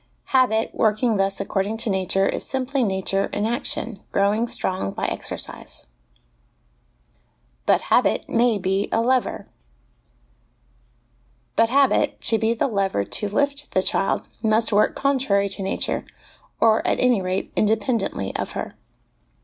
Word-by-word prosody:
Habit, 235 -4 +2
working 220 +1 +1
thus 195 0 0
according 200 +3 -2
to 230 0 -1
nature, 190 0 +1
is - - -2
simply 265 0 0
nature 195 -1 0
in 205 - -3
action, 230 -2 -2
growing 205 +4 +1
strong 185 - -2
by - - -3
exercise. - - -5 1.8
But - - +4
Habit - - +2
may 235 -1 +2
be 195 +1 -1
a - - +2
Lever. 250 +2 0 2.1
But 225 0 +3
habit, 275 +1 +2
to 225 - +3
be 225 +1 +1
the 230 - +1
lever 195 - 0
to 210 - -3
lift 285 +6 -1
the 185 - +2
child, 195 - 0 0.2
must 220 0 +1
work 205 - +3
contrary 255 -8 +1
to 195 - -3
nature, 195 0 -2 0.5
or 220 -1 +4
at - - 0
any 245 -5 +3
rate, 185 +1 -3
independently 215 - 0
of - - -3
her. - - -5
215 Hz, 135 wpm, -23 LUFS, 195-240 Hz, 2.1 s, But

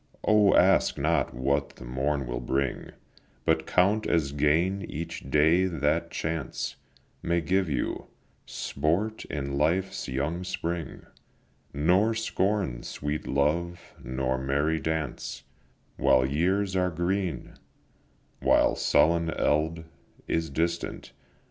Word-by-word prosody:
O, 105 -2 +5
ask 95 +2 +4
not 75 +2 +1
what 70 +3 -1
the 65 - -11
morn 65 +3 -1
will - - -3
bring, 65 +2 -2 0.6
But - - +1
count 100 +4 +2
as 80 -5 +1
gain 80 +7 +2
each 85 -3 -6
day 80 +6 +4
that 75 -5 0
chance 80 -4 -3 0.5
May 85 0 +1
give 90 +2 +1
you; 70 -5 -2 0.4
sport 100 +8 -1
in 70 -1 -3
life's 90 +6 0
young 75 +7 -2
spring, 85 -4 -4 0.7
Nor 95 +10 +2
scorn 100 - -1
sweet 75 +4 -4
love, 85 +5 0 0.2
nor 65 0 -1
merry 70 +4 0
dance, 80 -5 -3 0.5
While 65 - +4
years 95 +8 0
are 90 -1 +2
green, 90 +2 -2 0.9
while - - +3
sullen 85 +2 +3
eld 80 +1 0 0.4
Is 80 0 -1
distant. 85 +4 -2
80 Hz, 110 wpm, -27 LUFS, 70-90 Hz, 0.9 s, O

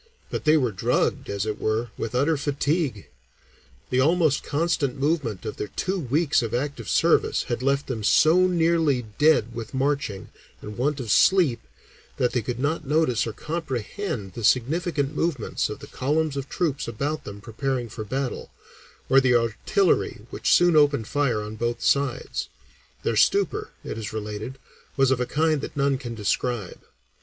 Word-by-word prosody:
But - - -4
they 155 +1 +6
were 125 -6 +1
drugged, 95 - 0
as 100 0 -2
it 110 -1 -4
were, 110 +2 0
with 115 +2 -4
utter 145 +6 +2
fatigue; 145 - -1 0.8
the 125 - +2
almost 155 0 +3
constant 150 -3 0
movement 135 - -1
of 110 - -5
their - - -3
two 190 - -2
weeks 150 +2 +1
of 115 0 -2
active 130 -3 -3
service - - +3
had 120 0 -3
left 140 +1 +1
them 115 -5 -4
"so 160 - +5
nearly 165 -7 +2
dead 150 -7 +4
with 115 +1 -7
marching 135 -7 -1 0.3
and 105 - -8
want 140 +5 0
of 115 -5 -3
sleep" 175 -11 +4 0.6
that 125 - +1
they 120 0 0
could 120 +2 -4
not 155 +4 -1
notice 150 -7 +2
or - - -2
comprehend 140 - -4
the 115 - -7
significant 145 - +1
movements 160 -9 -1
of - - -5
the - - -8
columns 150 +2 -1
of 140 -1 -4
troops 155 -6 -1
about 145 +7 -3
them 100 0 -8
preparing 120 +3 -3
for 110 0 -7
battle, 130 +4 -3 0.6
or 135 +1 +5
the 130 -2 +3
artillery 115 - +1
which - - -1
soon 175 -2 +5
opened 145 -7 +3
fire 140 -7 0
on 105 +1 -7
both 120 +1 -2
sides; 140 -3 0 0.5
their - - 0
stupor, 420 +2 +2
it - - -5
is 105 - -5
related, 105 +4 -5 0.4
was 135 -1 +4
of 130 - +2
a 125 - -1
kind 155 -1 +1
that 145 - -7
none 140 -1 +1
can 120 -4 -6
describe. 110 -1 -2
135 Hz, 165 wpm, -25 LUFS, 115-155 Hz, 0.8 s, they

